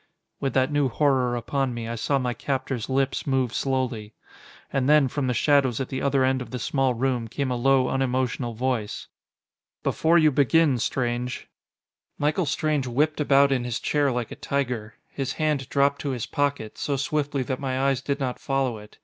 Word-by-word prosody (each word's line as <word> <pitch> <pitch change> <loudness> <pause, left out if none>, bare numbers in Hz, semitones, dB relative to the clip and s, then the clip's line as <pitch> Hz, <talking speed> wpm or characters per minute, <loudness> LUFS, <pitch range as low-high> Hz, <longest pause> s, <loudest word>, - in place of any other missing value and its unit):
With 135 -3 -2
that 130 +2 +2
new 145 -2 +2
horror 130 -2 +2
upon 125 +1 -1
me, 115 -1 -5
I 115 - -3
saw 125 +5 0
my 125 -2 -1
captor's 130 -3 -3
lips 135 +2 0
move 130 -3 +1
slowly.... 125 -6 -2 0.6
And 135 0 +1
then, 150 -2 +6
from 135 +1 -2
the 125 - 0
shadows 140 -5 +3
at 135 - -3
the 130 - -3
other 140 -1 +2
end 130 0 +1
of 125 - -7
the 125 - -4
small 130 +1 0
room, 125 -1 -1
came 135 +3 -2
a - - 0
low, 130 +1 +3
unemotional 130 -2 -1
voice. 120 -3 -2 0.7
"Before 165 +2 +3
you 155 -2 +5
begin, 145 0 +3
Strange 120 +1 -2 0.3
" - - -68 0.3
Michael 150 +3 0
Strange 145 -1 0
whipped 150 +6 +1
about 140 -1 +4
in 130 -3 +1
his 120 -2 -3
chair 145 -2 +1
like 120 -2 -3
a - - -6
tiger. 125 -5 -3 0.2
His 135 -2 -3
hand 150 -4 -1
dropped 140 0 +2
to 145 - -2
his 115 - -3
pocket, 140 -7 -2
so 140 -1 -1
swiftly 145 -1 -1
that 130 0 -3
my 130 -2 -2
eyes 135 -1 +1
did 140 0 -2
not 130 -3 -2
follow 135 -5 -1
it. 105 0 -15
135 Hz, 190 wpm, -25 LUFS, 125-140 Hz, 0.7 s, then